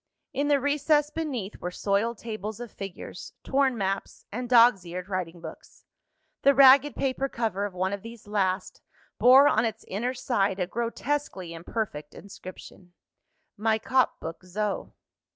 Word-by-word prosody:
In 285 +1 0
the 290 -1 +4
recess 295 +1 +2
beneath 270 -11 -4
were 180 - -4
soiled 205 +5 0
tables 215 -1 -6
of 240 -3 -7
figures, 195 -2 -8
torn 265 -2 +1
maps, 195 -1 -3
and 245 +3 -4
dogs 235 -5 +6
eared 180 +2 -7
writing 180 -3 -4
books. 160 -1 -11 0.6
The 280 0 +5
ragged 275 +1 +7
paper 270 0 -1
cover 215 -5 -2
of 200 -3 -6
one 190 +2 -1
of 200 - -4
these 230 0 -11
last, 195 -2 -1 0.4
bore 265 +3 +8
on 220 -5 +3
its 225 -1 -3
inner 240 +7 -2
side 200 -6 0
a 180 - +1
grotesquely 235 -3 -3
imperfect 165 -3 -5
inscription: 185 -2 -12 0.7
_my 220 0 +2
cop 260 +3 +1
book 165 +2 -7
zo. 200 +3 -3
220 Hz, 150 wpm, -27 LUFS, 190-260 Hz, 0.7 s, bore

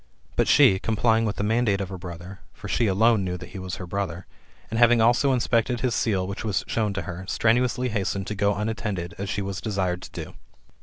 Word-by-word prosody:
But - - +2
she, 95 - +6
complying 110 +1 +2
with 105 - -1
the - - -2
mandate 110 -2 +1
of 95 -2 -3
her 95 - -6
brother 90 +2 -9
(for - - -9
she 115 - +1
alone 110 +2 +3
knew 90 -1 -3
that - - -10
he 95 - -8
was 95 0 -5
her 90 - -7
brother), 90 -1 -4 0.5
and 115 - -1
having 120 0 +6
also 120 +5 +4
inspected 120 -1 +1
his 125 -3 +1
seal, 100 -6 0
which 100 +1 -5
was 105 -3 -1
shown 110 -2 -1
to 95 -2 -3
her, 85 +2 -6
strenuously 125 +3 +1
hastened 100 -2 -2
to 105 - -4
go 100 0 +1
unattended, 105 -4 -3
as 100 0 -3
she 100 -1 -2
was 95 -1 -4
desired 95 -4 -1
to - - -10
do. - - -12
100 Hz, 220 wpm, -25 LUFS, 95-115 Hz, 0.5 s, she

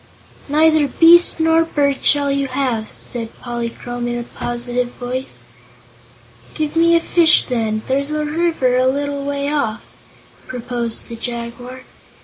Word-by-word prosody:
"Neither 310 0 +3
beast 335 +5 +5
nor 325 0 +3
bird 285 -4 0
shall 285 -1 +3
you 275 0 0
have," 255 -5 -2
said 230 -2 -6
Polychrome 240 0 -5
in 240 0 -2
a 240 - -4
positive 240 +1 -2
voice. 255 +1 -5 1.1
"Give 305 0 -3
me 335 +1 +4
a - - +5
fish, 335 -1 +4
then; 220 -3 -2
there's 280 +2 -1
a 305 0 -2
river 300 -5 0
a 255 0 +3
little 285 +1 -2
way 280 0 -2
off," 235 -7 -2 0.6
proposed 240 -2 -3
the 235 - -7
Jaguar. 240 +2 -7
260 Hz, 135 wpm, -18 LUFS, 240-300 Hz, 1.1 s, beast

